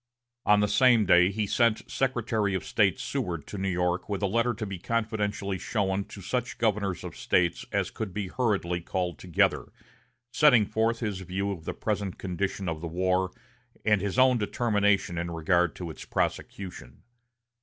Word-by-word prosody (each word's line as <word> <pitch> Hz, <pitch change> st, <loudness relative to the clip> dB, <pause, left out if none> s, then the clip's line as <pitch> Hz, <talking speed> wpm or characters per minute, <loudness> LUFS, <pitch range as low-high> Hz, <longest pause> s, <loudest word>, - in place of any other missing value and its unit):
On 105 Hz, 0 st, +6 dB
the 105 Hz, -, +3 dB
same 115 Hz, +1 st, +5 dB
day 90 Hz, 0 st, +6 dB
he 105 Hz, +1 st, -1 dB
sent 115 Hz, +2 st, +2 dB
Secretary 115 Hz, -6 st, 0 dB
of 95 Hz, -, -3 dB
State 100 Hz, -3 st, +2 dB
Seward 90 Hz, -, -3 dB
to 105 Hz, -, -7 dB
New 95 Hz, 0 st, -1 dB
York 90 Hz, +1 st, -1 dB
with 100 Hz, 0 st, -2 dB
a -, -, +4 dB
letter 115 Hz, +4 st, +1 dB
to 110 Hz, -, -4 dB
be 95 Hz, -3 st, -6 dB
confidentially 105 Hz, -3 st, -2 dB
shown 100 Hz, -2 st, -1 dB
to 100 Hz, -, -11 dB
such 125 Hz, +7 st, -2 dB
of -, -, -27 dB
the -, -, -23 dB
governors 100 Hz, -5 st, 0 dB
of -, -, -7 dB
States 85 Hz, -2 st, +1 dB
as -, -, 0 dB
could 110 Hz, -3 st, -5 dB
be 100 Hz, 0 st, -3 dB
hurriedly 95 Hz, -6 st, -1 dB
called 90 Hz, 0 st, -3 dB
together, 90 Hz, -4 st, +1 dB, 0.6 s
setting 130 Hz, -9 st, +6 dB
forth 110 Hz, +3 st, 0 dB
his 105 Hz, -4 st, -2 dB
view 95 Hz, +2 st, -3 dB
of 85 Hz, -5 st, -7 dB
the -, -, -4 dB
present 100 Hz, -3 st, -2 dB
condition 95 Hz, +1 st, -3 dB
of 80 Hz, -2 st, -3 dB
the 85 Hz, -, -4 dB
war, 90 Hz, +2 st, +1 dB, 0.6 s
and 105 Hz, -3 st, +3 dB
his 100 Hz, +3 st, -2 dB
own 130 Hz, -1 st, +5 dB
determination 105 Hz, -5 st, +1 dB
in 85 Hz, 0 st, -3 dB
regard 85 Hz, +1 st, +1 dB
to 85 Hz, -3 st, -6 dB
its -, -, -10 dB
prosecution. 90 Hz, -10 st, -4 dB
100 Hz, 180 wpm, -28 LUFS, 90-110 Hz, 0.6 s, On